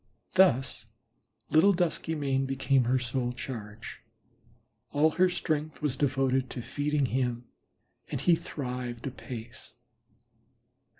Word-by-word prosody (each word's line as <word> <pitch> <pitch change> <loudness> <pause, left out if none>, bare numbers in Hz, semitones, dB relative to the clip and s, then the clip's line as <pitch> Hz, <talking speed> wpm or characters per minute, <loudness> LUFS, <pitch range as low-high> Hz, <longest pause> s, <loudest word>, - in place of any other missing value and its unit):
Thus 180 -9 +3 0.6
little 170 +6 +6
Duskymane 150 -6 0
became 135 -1 +2
her 130 +2 +3
sole 125 0 -1
charge; 110 -4 -7 0.9
all 155 +2 +4
her 185 +3 +4
strength 155 -4 -2
was 145 -3 +1
devoted 135 -1 +1
to 120 - -5
feeding 145 +1 0
him, 125 -1 -1 0.6
and - - -2
he 175 - +4
thrived 125 -6 -5
apace. 120 -3 -8
135 Hz, 105 wpm, -29 LUFS, 125-150 Hz, 0.9 s, little